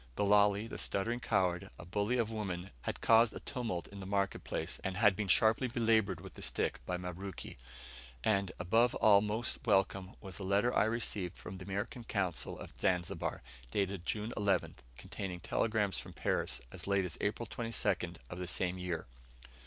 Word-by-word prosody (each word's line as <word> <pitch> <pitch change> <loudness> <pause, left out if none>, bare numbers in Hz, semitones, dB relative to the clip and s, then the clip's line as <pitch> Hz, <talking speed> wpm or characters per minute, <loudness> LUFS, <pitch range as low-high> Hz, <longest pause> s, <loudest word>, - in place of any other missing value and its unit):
Bilali, 105 0 +4
the - - -6
stuttering 115 +5 0
coward, 95 -6 +1
a - - -9
bully 105 +7 0
of 115 -2 +1
women, 95 -4 -4
had - - -3
caused 115 0 +5
a - - -4
tumult 115 -11 -3
in 100 - -9
the 95 - -6
market 100 -1 0
place, 80 +2 -3
and 95 0 -2
had 105 -2 +5
been 105 0 -2
sharply 110 +6 +4
belaboured 115 -4 +2
with - - -10
the - - -7
stick - - 0
by 90 - 0
Mabruki. 90 +1 -6 0.7
And, 100 -3 +2
above 115 +7 +3
all 100 -2 +6
most 110 +3 -1
welcome, 95 -4 +2
was 95 -1 -8
a - - -4
letter 100 +6 +2
I - - +5
received 105 -5 -1
from 95 +1 -8
the 90 - -8
American 100 +5 -3
Consul 95 -7 -1
at - - -13
Zanzibar, 90 -2 0 0.3
dated 95 +3 -1
June 110 +2 -1
11th, 100 -3 +1 0.2
containing 90 +4 -5
telegrams 105 0 0
from - - -9
Paris - - -1
as - - -8
late 100 -1 +2
as 85 - -5
April 105 +3 -1
22nd 105 -6 -1 0.2
of 90 - -5
the 90 - -3
same 90 +1 -1
year! 90 -2 -3
100 Hz, 175 wpm, -34 LUFS, 90-110 Hz, 0.7 s, all